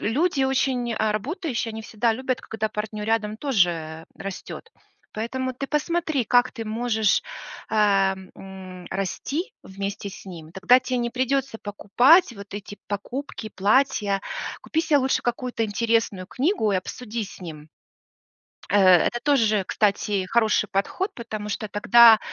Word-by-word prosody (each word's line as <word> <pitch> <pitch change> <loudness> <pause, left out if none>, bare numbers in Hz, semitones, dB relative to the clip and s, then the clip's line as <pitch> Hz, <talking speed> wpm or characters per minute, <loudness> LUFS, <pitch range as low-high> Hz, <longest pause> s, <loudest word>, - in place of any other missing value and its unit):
люди 285 +5 +1
очень, 260 -3 0
а, 215 -1 +1
работающие, 255 - -3
они 220 - -6
всегда 225 +1 0
любят, 255 +1 -2
когда 220 0 -3
партнер 210 0 -5
рядом 215 -1 0
тоже 175 - 0
растет. 195 -1 -8 0.4
Поэтому 255 +4 -3
ты 265 +2 -5
посмотри, 310 -2 0
как 245 +3 +3
ты 230 -3 -6
можешь, 220 -1 +1 0.5
э, - - -1 0.6
м, 185 -1 -10
расти 285 - -3
вместе 200 +1 -5
с 195 - -11
ним. 165 -5 -10
Тогда 190 +7 +5
те 255 0 -2
не 240 0 -1
придется 260 -1 -1
покупать 245 - +4
вот 200 -2 -10
эти 205 0 -8
покупки, 220 +3 -5
платья. 205 -1 +2 0.4
Купи 320 - 0
се 310 -2 +2
лучше 265 -1 +1
какую-то 240 0 -2
интересную 220 -3 0
книгу 250 - 0
и - - +2
обсуди 225 +4 -4
с 195 - -12
ним. 155 -4 -9 1.0
Э, 205 - +4 0.3
это 240 - -3
тоже, 220 -9 +2
кстати, 200 -2 +1
хороший 220 -1 +2
подход, 280 - -1
потому 215 -3 -6
что 215 +1 -3
тогда 220 +2 +7
220 Hz, 140 wpm, -24 LUFS, 200-255 Hz, 1.0 s, тогда